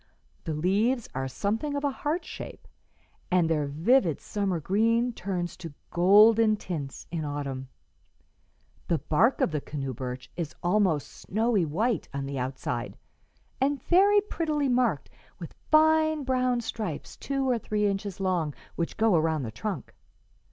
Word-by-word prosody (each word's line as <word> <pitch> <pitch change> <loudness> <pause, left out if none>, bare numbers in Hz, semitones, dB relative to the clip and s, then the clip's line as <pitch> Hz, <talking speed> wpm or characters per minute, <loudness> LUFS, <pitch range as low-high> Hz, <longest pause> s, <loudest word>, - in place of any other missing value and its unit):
The 160 - -2
leaves 210 - +1
are 130 0 -2
something 220 - -2
of 285 - -2
a 285 - +1
heart 300 +6 -2
shape, - - -9 0.6
and 180 -3 +3
their 150 -3 0
vivid 165 - +2
summer 195 -4 -2
green 230 +8 +2
turns 180 -4 -3
to 165 -4 -9 0.2
golden 215 +5 +6
tints 155 -9 -6
in 165 -2 -2
autumn. 140 -3 -4 1.2
The 170 - +2
bark 220 - +2
of - - +2
the 150 -2 -2
canoe 135 -3 -4
birch 125 +1 -6
is 165 -4 -4
almost 175 -5 +2
snowy 215 -2 0
white 215 +10 -1
on 140 -1 -2
the 135 -1 -4
outside, 130 +1 -4 0.6
and 280 +1 +2
very 405 +3 +5
prettily 305 -8 -1
marked 250 0 +1 0.3
with - - -9 0.2
fine 315 -1 +4
brown 255 -2 +1
stripes 215 -8 -5
two 275 -1 -2
or 245 -2 +2
three 210 -1 -1
inches 195 -1 -2
long, 175 -6 0 0.2
which 170 - -3
go 220 -2 +3
around 160 -2 +1
the 110 - -4
trunk. 205 - -5
200 Hz, 145 wpm, -27 LUFS, 155-245 Hz, 1.2 s, golden